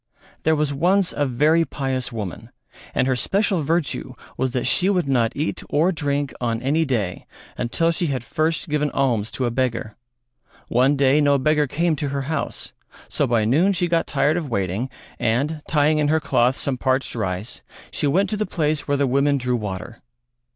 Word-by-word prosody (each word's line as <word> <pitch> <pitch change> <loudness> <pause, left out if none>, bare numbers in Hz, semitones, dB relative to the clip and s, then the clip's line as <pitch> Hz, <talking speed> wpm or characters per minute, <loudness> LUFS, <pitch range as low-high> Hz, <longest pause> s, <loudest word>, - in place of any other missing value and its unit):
There 160 0 +3
was 150 -1 0
once 180 +6 +2
a 145 - +1
very 150 +7 +3
pious 135 -5 -3
woman 105 -7 -6 0.5
and - - +2
her 130 -1 +1
special 190 - +1
virtue 155 -2 -1 0.2
was 130 - 0
that 125 -1 -2
she 185 +1 +3
would 180 -7 +1
not 120 -4 +2
eat 150 +3 -2
or 160 +6 +3
drink 145 -4 -2
on 115 -2 0
any 155 +5 +2
day 105 - -2 0.3
until 165 +8 0
she 170 +1 -1
had 130 -4 -2
first 160 +5 -1
given 150 -1 0
alms 120 -6 +1
to 130 - -2
a 120 - 0
beggar. 115 -4 -2 0.7
One 130 +4 +3
day 140 +1 +4
no 145 -1 +4
beggar 150 +2 +2
came 165 +4 0
to 145 0 -2
her 140 0 -2
house, 155 +1 -4 0.4
so - - 0
by 115 -2 +2
noon 165 - +3
she 175 -1 0
got 165 -1 +1
tired 145 +3 +1
of 160 -5 -3
waiting, 100 +3 -1 0.3
and, 140 +7 0
tying 150 0 +3
in 150 - +2
her 160 +2 +3
cloth 130 -4 +2
some 130 -3 -2
parched 130 +1 0
rice, 100 -2 -4 0.3
she - - -1
went 190 +8 +2
to 210 - -1
the 215 - -1
place 155 -4 -1
where 145 -1 +1
the 140 - +2
women 140 +2 +2
drew 125 -1 -1
water. 105 +1 -5
140 Hz, 190 wpm, -22 LUFS, 125-155 Hz, 0.7 s, day